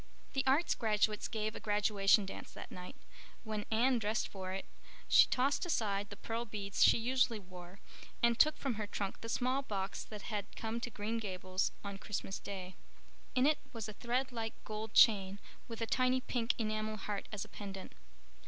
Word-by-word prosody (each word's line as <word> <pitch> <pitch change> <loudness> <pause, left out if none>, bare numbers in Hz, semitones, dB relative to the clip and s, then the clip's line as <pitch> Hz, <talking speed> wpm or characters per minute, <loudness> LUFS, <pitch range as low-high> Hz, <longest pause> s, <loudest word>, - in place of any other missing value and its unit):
The 270 - +1
Arts 290 +6 +4
graduates 210 -2 +1
gave 215 -1 -2
a - - -5
graduation 205 -1 +3
dance 190 - -7
that - - -9
night. 180 0 -8 0.5
When 215 -2 -4
Anne 240 +3 +3
dressed 215 +1 0
for 190 -1 -6
it 190 +1 -4 0.4
she - - +8
tossed 270 +3 +2
aside 205 - 0
the 200 - -7
pearl 230 +3 -3
beads 205 -3 0
she - - +7
usually 250 0 +2
wore 180 -1 -11 0.4
and 235 0 +4
took 305 0 +6
from 270 -3 -1
her 210 - -3
trunk 200 -1 -4
the 230 - -5
small 255 +3 +1
box 200 -7 -3
that 210 -2 -8
had 210 -3 -4
come 225 +1 -3
to 245 - -3
Green 225 +1 -2
Gables 185 -2 -1
on 200 -1 -5
Christmas 195 -1 -3
day. 190 -2 -6 0.6
In 255 0 +4
it 300 +1 +4
was 225 -2 -4
a 215 - -6
thread 250 +5 -1
like 225 -2 -3
gold 215 0 -5
chain 195 -3 +6 0.3
with 230 -1 -7
a - - +2
tiny 255 +2 +3
pink 240 -2 0
enamel 215 -1 -1
heart 205 0 -4
as 210 -2 -3
a - - -13
pendant. 195 -2 -8
215 Hz, 185 wpm, -35 LUFS, 200-235 Hz, 0.6 s, she